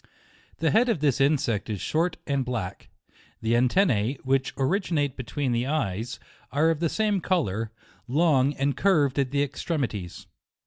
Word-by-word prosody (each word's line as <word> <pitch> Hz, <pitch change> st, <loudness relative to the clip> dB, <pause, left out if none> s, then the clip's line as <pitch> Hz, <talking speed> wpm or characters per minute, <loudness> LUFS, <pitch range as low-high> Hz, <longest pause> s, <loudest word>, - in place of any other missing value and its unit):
The 160 Hz, -1 st, +1 dB
head 240 Hz, +4 st, +4 dB
of 225 Hz, -, +1 dB
this 140 Hz, -2 st, +1 dB
insect 135 Hz, -7 st, +1 dB
is 105 Hz, -3 st, -3 dB
short 165 Hz, -, 0 dB
and 140 Hz, -2 st, 0 dB
black; 115 Hz, -7 st, -5 dB, 0.5 s
the 115 Hz, +1 st, +1 dB
antennae, 125 Hz, -, +2 dB
which 135 Hz, 0 st, +1 dB
originate 145 Hz, -2 st, 0 dB
between 130 Hz, +1 st, -3 dB
the 120 Hz, +2 st, 0 dB
eyes, 120 Hz, -5 st, -2 dB, 0.3 s
are 155 Hz, +5 st, +3 dB
of 160 Hz, -, -2 dB
the 165 Hz, -1 st, +1 dB
same 210 Hz, -1 st, 0 dB
colour, 115 Hz, -, -1 dB, 0.4 s
long 145 Hz, 0 st, +3 dB
and 140 Hz, -1 st, 0 dB
curv 150 Hz, -4 st, +3 dB
ed 135 Hz, -, -4 dB
at 130 Hz, -, -1 dB
the 140 Hz, +1 st, +1 dB
extremities. 130 Hz, -, -3 dB
140 Hz, 155 wpm, -26 LUFS, 120-160 Hz, 0.5 s, head